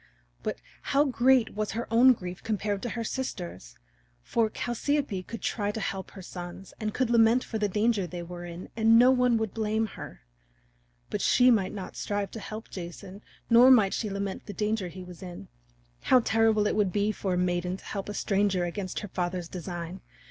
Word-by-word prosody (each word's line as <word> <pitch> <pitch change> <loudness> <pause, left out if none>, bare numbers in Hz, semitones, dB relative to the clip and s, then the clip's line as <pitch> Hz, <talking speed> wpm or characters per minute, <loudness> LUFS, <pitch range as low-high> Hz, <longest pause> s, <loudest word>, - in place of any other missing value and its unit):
But - - -3 0.2
how 285 +2 +2
great 255 -2 +3
was 210 -1 -2
her 230 +2 -2
own 250 +3 +7
grief 180 -4 -7
compared 205 -2 -2
to 240 - -3
her 230 0 -3
sister's! 180 - -5 0.5
For 225 - +1
Chalciope 240 -2 -1
could 230 - -7
try 205 -2 -1
to 210 - -3
help 195 -2 -4
her 190 - -10
sons 175 +1 -8
and 215 -2 -2
could 250 +1 0
lament 230 +1 +5
for 220 - -4
the 210 -1 +1
danger 210 -1 +1
they 175 +1 -6
were 175 0 -8
in 175 +1 -8
and 225 0 +5
no 250 +2 +7
one 250 -2 +3
would 220 -3 -2
blame 220 0 0
her. 215 - -9 0.9
But - - -2
she 250 0 +5
might 200 -5 +2
not 195 -3 -7
strive 205 -1 -2
to 225 - -7
help 215 +1 -8
Jason 185 +2 -8 0.3
nor 240 +2 +7
might 215 -7 +6
she 215 - -2
lament 200 -1 -3
for - - -31
the 205 - -5
danger 210 -1 -1
he 185 +1 -9
was 180 -2 -11
in. 175 - -9 0.5
How 255 - +5
terrible 225 -2 +3
it - - +1
would 205 -3 +2
be 205 +3 +1
for 190 -3 -2
a - - -1
maiden 180 0 0
to - - -17
help 200 -1 -5
a 205 - -5
stranger 195 -3 +1
against 185 +1 -4
her 210 - -6
father's 180 -2 -3
design! 175 0 -6
205 Hz, 200 wpm, -28 LUFS, 185-225 Hz, 0.9 s, own